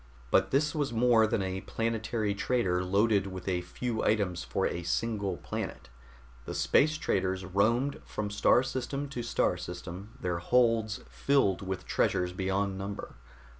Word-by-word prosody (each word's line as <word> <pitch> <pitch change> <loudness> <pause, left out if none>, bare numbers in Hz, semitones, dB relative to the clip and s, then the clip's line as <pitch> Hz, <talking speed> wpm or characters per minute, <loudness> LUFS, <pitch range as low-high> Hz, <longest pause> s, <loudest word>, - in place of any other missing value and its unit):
But 95 0 +4
this 150 +5 +2
was 145 -4 -1
more 115 -1 +4
than 105 -2 0
a 95 0 -3
planetary 115 -1 -1
trader 100 -5 0
loaded 100 +1 +2
with 95 -1 -7
a 90 -2 +1
few 110 +6 -3
items 100 -5 +1
for - - -1
a 85 - -2
single 100 +1 -1
planet. - - -5 0.6
The - - -5
space 155 +2 +3
traders 95 -8 -1
roamed 115 +9 +1
from 105 -1 -4
star 110 +4 +4
system 135 +2 -3
to 125 -3 -4
star 115 -6 +1
system, 90 +4 -8
their 90 -2 -1
holds 115 +1 +2
filled 130 -11 +2
with 95 -1 -4
treasures 90 0 +1
beyond 95 +1 -1
number. 100 +1 -5
100 Hz, 150 wpm, -30 LUFS, 95-120 Hz, 0.6 s, But